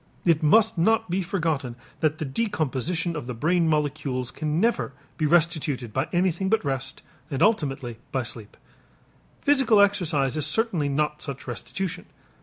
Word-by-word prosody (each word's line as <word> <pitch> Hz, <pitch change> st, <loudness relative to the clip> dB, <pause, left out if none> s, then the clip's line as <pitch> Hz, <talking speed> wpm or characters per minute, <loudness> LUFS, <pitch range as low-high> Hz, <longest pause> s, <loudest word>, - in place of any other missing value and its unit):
It 165 Hz, -3 st, +4 dB
must 195 Hz, +5 st, +4 dB
not 225 Hz, +2 st, +2 dB
be 190 Hz, +2 st, +1 dB
forgotten 160 Hz, -, -2 dB, 0.2 s
that 155 Hz, -1 st, +1 dB
the 155 Hz, -, -3 dB
decomposition 165 Hz, -, -1 dB
of 150 Hz, -6 st, -5 dB
the 125 Hz, -, -4 dB
brain 165 Hz, +7 st, +2 dB
molecules 145 Hz, -4 st, -1 dB
can 155 Hz, 0 st, -2 dB
never 225 Hz, -9 st, +1 dB, 0.2 s
be 155 Hz, -, 0 dB
restituted 150 Hz, -8 st, +1 dB
by 130 Hz, +5 st, 0 dB
anything 185 Hz, +1 st, +1 dB
but 220 Hz, -5 st, +1 dB
rest, 135 Hz, -1 st, -3 dB, 0.3 s
and 140 Hz, +1 st, 0 dB
ultimately 135 Hz, -, 0 dB
by 130 Hz, -2 st, 0 dB
sleep. 115 Hz, -3 st, -7 dB, 0.9 s
Physical 270 Hz, -7 st, +4 dB
exercise 175 Hz, -9 st, +2 dB
is 150 Hz, -1 st, 0 dB
certainly 175 Hz, -6 st, 0 dB
not 150 Hz, +2 st, -1 dB
such 140 Hz, -3 st, -6 dB
restitution. 180 Hz, +9 st, -4 dB
155 Hz, 150 wpm, -25 LUFS, 135-185 Hz, 0.9 s, It